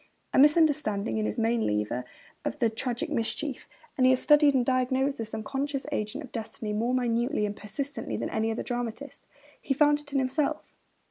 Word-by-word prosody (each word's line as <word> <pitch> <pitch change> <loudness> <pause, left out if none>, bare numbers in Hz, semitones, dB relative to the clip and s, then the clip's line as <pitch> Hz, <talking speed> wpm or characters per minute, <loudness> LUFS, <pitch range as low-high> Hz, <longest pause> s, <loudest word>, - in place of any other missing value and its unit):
A - - +4
misunderstanding 290 -9 +3
is 215 - 0
his - - -3
main 230 0 +1
lever 105 +4 -1 0.4
of - - -3
the 230 -2 +2
tragic 250 +7 -2
mischief; 260 +2 -2 0.3
and 260 - +1
he 255 - +7
has 255 0 +4
studied 295 -2 +5
and 250 -2 +3
diagnosed 260 +1 +1
this 225 -1 -4
unconscious 270 +5 -3
agent 215 +3 -3
of 260 - -11
destiny 220 -2 -5
more 235 +4 0
minutely 240 -1 +1
and 205 0 -3
persistently 270 +9 -4
than - - -3
any 220 0 0
other 225 - -2
dramatist. 245 +3 -5 0.3
He 270 - -1
found 295 +1 +4
it 295 -1 -12
in 275 - 0
himself. 270 +3 -1
255 Hz, 185 wpm, -28 LUFS, 225-285 Hz, 0.4 s, he